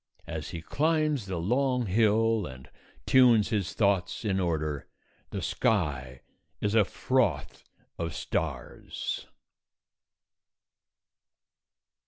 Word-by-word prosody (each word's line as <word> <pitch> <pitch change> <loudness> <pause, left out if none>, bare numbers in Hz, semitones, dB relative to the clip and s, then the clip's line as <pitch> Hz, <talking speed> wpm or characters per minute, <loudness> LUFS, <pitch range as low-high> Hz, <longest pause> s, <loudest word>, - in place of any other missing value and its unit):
As - - -5
he 85 -1 -6
climbs 155 - +1
the 95 -2 -3
long 125 +7 +1
hill 110 +1 +2
and 65 0 -12 0.3
tunes 120 -5 +5
his 105 -6 -1
thoughts 100 -2 +1
in 95 -2 +1
order, 75 -5 -1 0.4
the - - -4
sky 70 - 0 0.4
is 105 0 -1
a 110 -2 +6
froth - - -1 0.4
of 85 -3 -3
stars. - - -4
100 Hz, 95 wpm, -28 LUFS, 85-115 Hz, 0.4 s, a